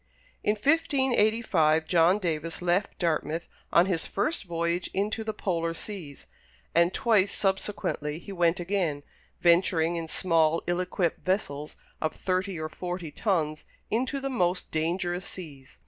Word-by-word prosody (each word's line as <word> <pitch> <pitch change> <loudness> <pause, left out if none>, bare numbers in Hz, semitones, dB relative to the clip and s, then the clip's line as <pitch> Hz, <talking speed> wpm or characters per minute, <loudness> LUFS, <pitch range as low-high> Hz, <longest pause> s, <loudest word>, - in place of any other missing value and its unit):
In 210 - +2
1585 225 - +2
John 175 +3 +4
Davis 165 -3 -3
left 180 +3 +1
Dartmouth 165 -1 -1 0.2
on 170 - +6
his 180 -4 -1
first 305 +6 -1
voyage 170 +1 -1
into 210 +3 0
the 220 - -2
Polar 165 -5 -2
Seas; 165 -8 -8 0.5
and 170 +1 +4
twice 205 -4 +3
subsequently 190 -6 -1
he 190 +4 -9
went 175 -1 +2
again, 175 -6 -1 0.4
venturing 170 -1 +3
in 165 -1 -4
small, 165 -1 +2
ill 175 0 0
equipped 180 -2 -1
vessels 150 -6 -2 0.3
of 155 - -1
thirty 185 -1 -1
or 155 - -2
forty 175 -1 -5
tons 155 -7 -1 0.3
into 255 +5 0
the 275 0 -3
most 180 -6 0
dangerous 175 +3 -1
seas. 145 -7 -10
175 Hz, 135 wpm, -28 LUFS, 165-200 Hz, 0.5 s, on